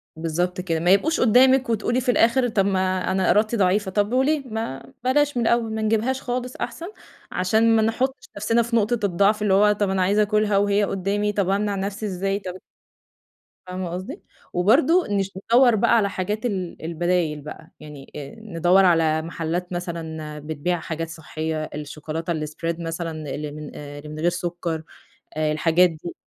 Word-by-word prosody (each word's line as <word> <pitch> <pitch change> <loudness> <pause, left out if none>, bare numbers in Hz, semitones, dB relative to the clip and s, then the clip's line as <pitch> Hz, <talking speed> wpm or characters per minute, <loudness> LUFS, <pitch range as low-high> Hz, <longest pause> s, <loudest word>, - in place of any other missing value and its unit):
بالضبط 175 +3 -2
كده، 165 -3 -1
ما 175 +2 +2
يبقوش 290 +12 +3
قدامِك 260 +2 +5
وتقولي 230 +3 0
في 250 0 +2
الآخر 245 +2 +3
طَب 200 -3 +1
ما 185 -1 0
أنا 190 -1 +1
إرادتي 215 +4 +3
ضعيفة، 195 +1 +2
طب 205 +3 0
وليه؟ 275 +3 +2
ما 225 - -5
بلاش 285 +1 +2
من 235 - +1
الأول، 230 -2 +1
ما 220 - -2
نجيبهاش 225 +5 0
خالص 250 0 -3
أحسن، 330 +9 -5 0.4
عشان 220 +5 +3
ما 220 - +4
نحطش 255 +4 -1
نفْسنا 230 +3 +2
في 235 +1 -2
نقطة 225 +1 +2
الضعف، 200 +3 +2
اللي 205 -2 +2
هو، 210 +2 +5
طَب 205 -1 0
أنا 190 0 0
عايزة 200 +3 +3
آكلها 210 -1 +2
وهي 205 +1 +2
قدامي، 200 +2 -1
طَب 195 -2 0
أمنع 200 +1 0
نفسي 200 +2 -3
إزاي؟ 195 +1 -1
طَب 185 -3 -6 1.1
فاهمة 180 -1 -4
قصدي؟ 190 - -6 0.3
وبرضه 285 - +3
نش 195 -1 0 0.2
ندوّر 245 -1 +6
بقى 235 +2 +3
على 200 -2 +2
حاجات 210 +5 -3
ال 185 -6 -3
البدايل 170 -2 0
بقى، 150 +2 -10
يعني 150 -3 -11 0.3
ندوّر 185 -2 +3
على 160 -2 +3
محلات 170 +2 -4
مثلًا 160 -3 -5
بتبيع 155 +3 -2
حاجات 165 0 -4
صحية، 160 -1 -4
الشكولاتة 155 +3 -4
الSpread 155 +2 -3
مثلًا 165 -3 -4
اللي 150 0 -5
من 150 0 -9
اللي 145 +1 -9
من 155 0 -7
غير 175 +2 +3
سكر، 170 -2 -3 0.5
الحاجات 160 +3 +3
دي، 165 +2 -8
190 Hz, 165 wpm, -23 LUFS, 165-220 Hz, 1.1 s, ندوّر